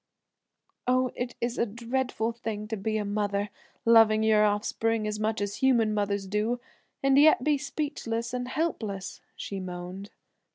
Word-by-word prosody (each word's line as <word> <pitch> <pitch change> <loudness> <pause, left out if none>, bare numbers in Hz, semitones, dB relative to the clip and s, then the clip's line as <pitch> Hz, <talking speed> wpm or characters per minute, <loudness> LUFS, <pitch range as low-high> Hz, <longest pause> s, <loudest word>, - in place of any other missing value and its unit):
"Oh, 255 0 +2
it 245 0 -4
is 240 +1 -2
a - - +3
dreadful 235 +1 -2
thing 225 -2 -5
to 220 - -1
be 215 +2 -1
a 210 - -2
mother, 205 0 -1 0.3
loving 225 -1 +6
your 215 -1 +5
offspring 215 +2 +1
as 210 0 -2
much 215 0 0
as 205 0 -2
human 235 -5 +3
mothers 200 -1 -1
do, 210 +5 -1 0.4
and 275 0 +5
yet 295 -4 +6
be 295 -1 +2
speechless 265 -5 -3
and 250 0 -2
helpless," 225 - -3
she 195 - -5
moaned. 180 +2 -7
220 Hz, 155 wpm, -28 LUFS, 205-245 Hz, 0.4 s, loving